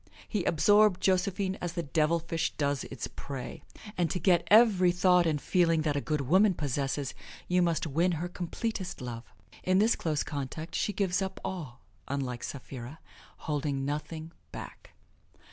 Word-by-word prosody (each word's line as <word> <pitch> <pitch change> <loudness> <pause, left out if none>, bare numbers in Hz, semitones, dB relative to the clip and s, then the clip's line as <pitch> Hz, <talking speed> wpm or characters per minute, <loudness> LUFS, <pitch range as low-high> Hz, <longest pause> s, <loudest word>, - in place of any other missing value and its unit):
He 210 -5 -1
absorbed 205 +3 +4
Josephine 190 +1 +1
as 175 -1 -3
the 170 -1 -2
devilfish 165 +2 0
does 140 -2 -1
its 135 - -5
prey. 135 -3 -7 0.3
And 175 -2 +1
to - - -1
get 175 +1 +3
every 205 -5 +6
thought 180 -1 +4
and 150 -2 +1
feeling 165 -1 +2
that 150 -2 0
a 145 - 0
good 150 -1 -1
woman 185 +8 +4
possesses 140 -1 -2 0.3
you 180 0 +3
must 170 -2 +1
win 165 +4 +1
her 165 +2 -2
completest 180 +2 -4
love. 120 -2 -6 0.4
In 185 0 +3
this 220 +4 +4
close 155 -3 -1
contact 150 +3 -5
she - - 0
gives 195 -2 0
up 190 0 -3
all 150 -10 -5 0.3
unlike 130 -3 -3
Sapphira 130 +1 -7 0.5
holding 145 -2 -1
nothing 155 +3 -4 0.2
back. - - -10
165 Hz, 155 wpm, -30 LUFS, 145-185 Hz, 0.5 s, every